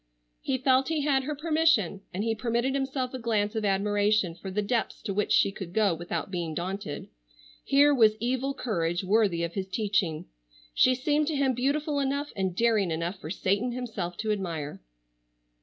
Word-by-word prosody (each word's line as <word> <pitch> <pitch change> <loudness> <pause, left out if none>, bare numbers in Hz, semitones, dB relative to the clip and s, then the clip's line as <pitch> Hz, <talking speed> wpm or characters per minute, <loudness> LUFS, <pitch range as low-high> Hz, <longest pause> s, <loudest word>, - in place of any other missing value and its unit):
He 265 - -1
felt 260 0 +3
he 320 -2 0
had 275 -2 +1
her 300 +1 -3
permission, 305 - +2
and 195 +3 -3
he 225 0 +1
permitted 235 +4 -1
himself 270 -2 -2
a 260 - -4
glance 215 -3 0
of 220 -1 -2
admiration 205 -1 +2
for 190 +3 -8
the 210 +2 -1
depths 230 +2 -1
to 200 - -3
which 210 +1 -1
she 200 - +4
could 190 -3 -8
go 210 -4 +3
without 175 +3 -4
being 170 -4 -3
daunted. 185 -2 -4 0.6
Here 290 +1 +5
was 220 -5 +4
evil 260 +3 -1
courage 175 -6 -1
worthy 195 -3 +2
of 170 0 -3
his 190 -2 -3
teaching. 190 -6 -1 0.5
She 255 - +4
seemed 295 +3 +1
to 310 - -1
him 275 -2 +2
beautiful 285 +4 0
enough 280 +1 -1
and 190 -3 -1
daring 220 -4 +2
enough 170 +4 -3
for 155 - -8
Satan 200 +7 0
himself 215 -8 -4
to 215 -1 -1
admire. 165 -8 -4
215 Hz, 180 wpm, -28 LUFS, 190-265 Hz, 0.6 s, Here